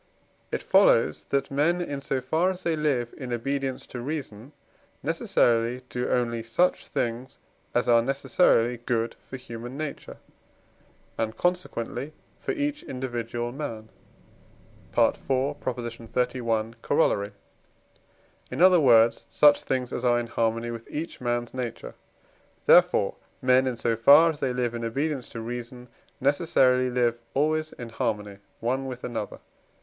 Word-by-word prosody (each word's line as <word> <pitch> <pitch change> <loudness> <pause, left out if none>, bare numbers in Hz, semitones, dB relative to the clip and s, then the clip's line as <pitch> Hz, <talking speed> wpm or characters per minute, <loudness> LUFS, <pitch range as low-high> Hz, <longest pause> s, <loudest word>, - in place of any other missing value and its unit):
it - - -2
follows - - +4
that 140 0 -1
men, 155 +6 +2
in 145 -5 -4
so 135 -1 -1
far 160 +8 +1
as 185 -1 -5
they 165 -1 +1
live 140 -6 0
in 130 -3 -6
obedience 135 +2 -2
to 120 - -7
reason, 135 -3 -6 0.5
necessarily 120 +2 +1
do 125 0 -2
only 120 -2 0
such 115 +11 +1
things 120 +3 -3 0.4
as 120 - +2
are 120 -1 +5
necessarily 125 -2 +2
good 115 -1 -2
for 130 - -9
human 120 +1 -8
nature, 150 -2 -6 1.0
and 110 0 -2
consequently 155 -6 -2 0.3
for - - -3
each 295 -3 -2
individual 120 -2 -4
man 115 -6 -6 1.1
(IV. - - +4
xxxi. 120 -4 -2
Coroll.); 100 0 +1 1.2
in 125 - -5
other 180 0 +7
words, 120 -5 +5
such 145 -1 +5
things 130 -2 -2
as 125 - -3
are 120 -1 +3
in 120 - -3
harmony 115 0 -1
with 115 -1 -8
each 160 -1 -5
man's 120 -1 -2
nature. 125 -3 -5 0.7
Therefore, - - +5 0.2
men 130 +1 +3
in 125 -2 -2
so 115 0 0
far 145 +9 +7
as 150 - -10
they 130 - 0
live 125 -1 -1
in 120 0 -4
obedience 135 +3 -2
to 115 - -7
reason, 120 +1 -7 0.3
necessarily 130 -3 +3
live 120 -1 0
always 155 +2 +1
in 120 -1 -8
harmony 105 -3 -3 0.2
one 130 +3 -1
with 125 -1 -7
another. 115 -4 -4
125 Hz, 135 wpm, -26 LUFS, 115-140 Hz, 1.2 s, other